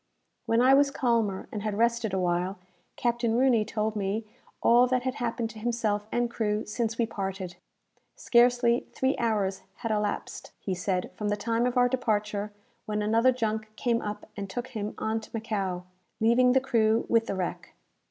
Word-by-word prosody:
When 230 +1 +3
I 260 +2 +6
was 280 +1 +5
calmer, 230 -7 0
and 210 - -4
had 210 -1 -2
rested 235 -1 +1
awhile, 180 0 0 0.4
Captain 235 -1 0
Rooney 250 -4 +4
told 215 0 -2
me 205 +2 -2 0.4
all 240 +2 +6
that 250 0 +1
had 260 0 -1
happened 230 -1 -2
to 215 - -11
himself 215 -3 -1
and 240 0 +1
crew 215 -2 -1
since 225 +1 -2
we 235 - +2
parted. 190 -4 -5 0.6
Scarcely 240 0 +3
three 265 +2 +1
hours 205 -5 0
had 230 -2 -4
elapsed, 210 -1 -3
he 190 - -3
said, 180 0 -2
from 210 -1 -3
the 205 - 0
time 230 +3 0
of 250 0 -2
our 245 0 +5
departure, 210 -4 -1 0.4
when 210 0 -1
another 230 +4 +4
junk 220 -3 -2
came 235 0 0
up 210 0 -5
and 200 -1 -5
took 245 +6 -4
him 215 -4 -4
on 220 +1 -1
to 220 - -13
Macao, 195 -5 -2 0.4
leaving 245 +3 +4
the 265 - +5
crew 225 -3 +2
with 230 -1 +2
the - - -2
wreck. 185 -2 -4
225 Hz, 175 wpm, -28 LUFS, 210-240 Hz, 0.6 s, I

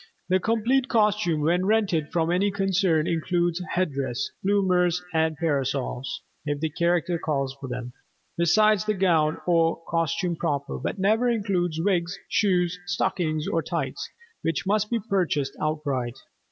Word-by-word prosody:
The 185 +1 +3
complete 230 +6 +1
costume 210 - +2
when 175 +5 +2
rented 195 -8 +1
from 165 -1 +1
any 190 +3 +2
concern 195 -5 +1
includes 175 +1 0
headdress, 140 -7 -1
bloomers 180 -3 +2
and 160 -1 +1
parasols 135 -4 -2 0.2
(if 145 -1 -2
the 160 0 -1
character 170 +1 +1
calls 140 -4 -1
for 135 - -5
them), 125 0 -5 0.4
besides 200 +4 +4
the 215 0 0
gown 165 -5 +2
or 165 -2 +2
costume 170 +1 0
proper, 145 -4 -2
but - - -3
never 220 +5 +2
includes 185 -8 0
wigs, 180 0 0
shoes, 180 -4 +1
stockings 175 -4 -1
or 165 - +1
tights, - - -3 0.3
which 165 0 -1
must 210 +1 +1
be 235 - 0
purchased 160 -9 0
outright. 140 -5 -2
175 Hz, 140 wpm, -25 LUFS, 155-195 Hz, 0.4 s, besides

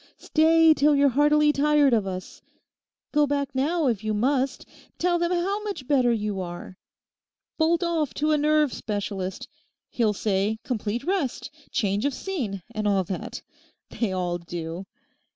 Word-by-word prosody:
Stay 325 0 +4
till 295 0 +3
you're 280 0 +4
heartily 295 +3 +4
tired 295 -2 +3
of 215 -4 +2
us. 185 -1 -7 0.7
Go 295 -1 +3
back 280 -1 -1
now, 305 +5 0
if 230 -6 0
you 215 0 -1
must; 265 +4 0 0.3
tell 350 0 +1
them 345 +1 0
how 380 +4 0
much 400 -12 -5
better 260 -4 +3
you 210 -4 -2
are. 175 +1 -7 0.8
Bolt 330 +2 +2
off 330 -4 0
to 305 +1 +1
a 305 - +3
nerve 300 -2 +2
specialist. 200 -3 -4 0.4
He'll 225 -3 +1
say 205 +1 0
complete 235 -1 -3
rest—change 275 - -2
of 285 -2 0
scene, 245 - -4
and 215 -2 -2
all 195 -2 +2
that. 185 +1 -6 0.5
They 230 -5 -1
all 180 -2 -2
do. 170 +2 -6
265 Hz, 150 wpm, -25 LUFS, 205-300 Hz, 0.8 s, Stay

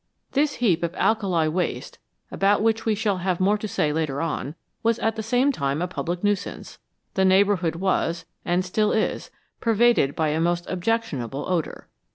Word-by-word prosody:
This 290 +1 +1
heap 195 -9 +2
of 170 0 -2
alkali 190 -8 +1
waste, 175 +4 -3 0.3
about 200 +2 +2
which 225 0 +1
we 220 - +3
shall 205 -2 0
have 180 -1 -1
more 205 +3 +2
to 215 - -4
say 150 -6 0
later 150 -3 -1
on, 160 -2 -3 0.3
was 230 0 +2
at 225 0 0
the 220 - -3
same 245 +5 +2
time 140 - -1
a 180 - -1
public 175 0 -4
nuisance; 205 -1 -2 0.3
the 190 - +1
neighbourhood 190 -3 +3
was, 170 -2 0 0.2
and 180 +1 0
still 210 +3 +1
is, 220 - -1 0.3
pervaded 230 - +3
by 160 -1 +1
a 155 +2 0
most 175 +1 0
objectionable 180 - -2
odour. 175 -4 -2
185 Hz, 175 wpm, -24 LUFS, 165-220 Hz, 0.3 s, we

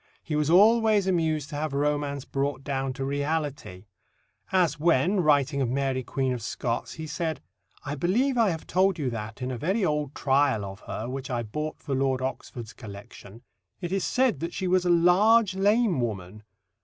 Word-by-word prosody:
He 155 - -3
was 150 0 +1
always 215 +2 +5
amused 160 -5 0
to 145 - -4
have 155 -1 -3
romance 145 -1 -1
brought 140 0 -2
down 135 -1 -2
to 135 0 -4
reality, 145 - -3 0.7
as 180 -5 +2
when, 170 +4 +3
writing 145 -3 +2
of 125 - 0
Mary 135 0 0
Queen 130 +1 -1
of 125 - -5
Scots, 120 +1 -3
he 160 - -7
said: 160 0 -3 0.5
"I 140 - -3
believe 220 - +1
I 230 -4 +3
have 160 -3 -4
told 190 +1 +2
you 135 -5 -2
that, 110 +2 -6
in 130 - -2
a 125 - -5
very 190 - 0
old 150 -3 -1
trial 135 -6 +2
of 95 0 -8
her, 110 - -4
which 130 +1 -5
I 120 -2 -1
bought 150 +8 -4
for 140 - -5
Lord 135 -1 +1
Oxford's 125 -3 -5
collection, 100 +1 -11 0.4
it 175 -2 -5
is 195 -1 0
said 255 -3 +1
that 170 +1 -4
she 190 - -2
was 180 0 +2
a - - +2
large 185 +5 +5
lame 200 - +2
woman. 105 -3 -4
145 Hz, 185 wpm, -26 LUFS, 130-180 Hz, 0.7 s, always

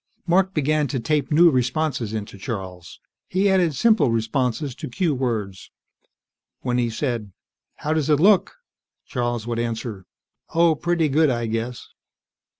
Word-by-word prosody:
Mark 190 +2 +2
began 150 0 +1
to 130 - -2
tape 145 +4 -1
new 165 +3 +6
responses 130 -2 -1
into 105 -2 -5
Charles. 95 -7 -7 0.3
He 190 +2 +1
added 175 -6 +2
simple 215 - +3
responses 125 +4 -1
to - - -7
cue 170 +4 0
words. 110 -8 -3 0.9
When 125 -1 0
he 120 -1 +1
said, 115 -4 -3 0.4
"How 155 - -2
does 155 -2 0
it 150 -2 +4
look?" 195 +1 +4 0.5
Charles 120 -3 -2
would 120 -1 -2
answer, 115 -4 -4 0.5
"Oh, 165 -1 +5
pretty 170 +1 0
good, 150 +2 +3
I 120 -2 -1
guess." 115 +2 -4
130 Hz, 145 wpm, -23 LUFS, 115-155 Hz, 0.9 s, new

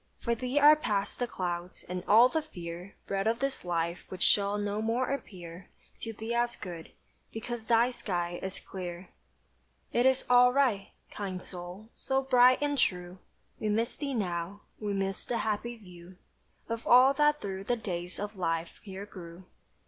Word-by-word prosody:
For 235 - 0
thee 250 +4 -3
are 295 +1 +9
past 205 -9 -1
the 245 - 0
clouds, 175 -3 -4
and 180 0 -5
all 225 +4 +8
the 320 +5 -1
fear 175 - -8
Bred 195 +1 -1
of 230 +1 +2
this 275 +1 -2
life 170 -1 -1
which 185 -1 -3
shall 200 0 +3
no 205 +1 -2
more 235 +4 0
appear 180 -9 -7 0.3
To 225 - -5
thee 220 +2 -5
as 240 0 +1
good; 170 -4 -8 0.4
because 225 0 -6
thy 235 +1 +4
sky 175 -7 -3
is 190 0 -5
clear. 180 -1 -7 0.8
"It 240 +2 +4
is 265 0 +2
all 250 0 +7
right." 250 -8 +2 0.2
Kind 190 -3 -5
soul, 180 +4 -8
so 270 0 -1
bright 255 -1 +6
and 290 -1 0
true, 180 -3 0 0.4
We 215 - -1
miss 225 +3 0
thee 280 -2 -3
now, 180 -1 -3 0.2
we 210 -1 -2
miss 195 -1 -1
the 240 - -2
happy 220 +2 -2
view 180 -3 -14 0.5
Of 230 0 -4
all 255 +3 +7
that 295 +1 +3
through 195 -1 -5
the 245 - +1
days 180 -4 -4
of 205 +1 -4
life 165 -2 -2
here 195 -1 -7
grew. 175 -3 -11
205 Hz, 170 wpm, -30 LUFS, 180-240 Hz, 0.8 s, are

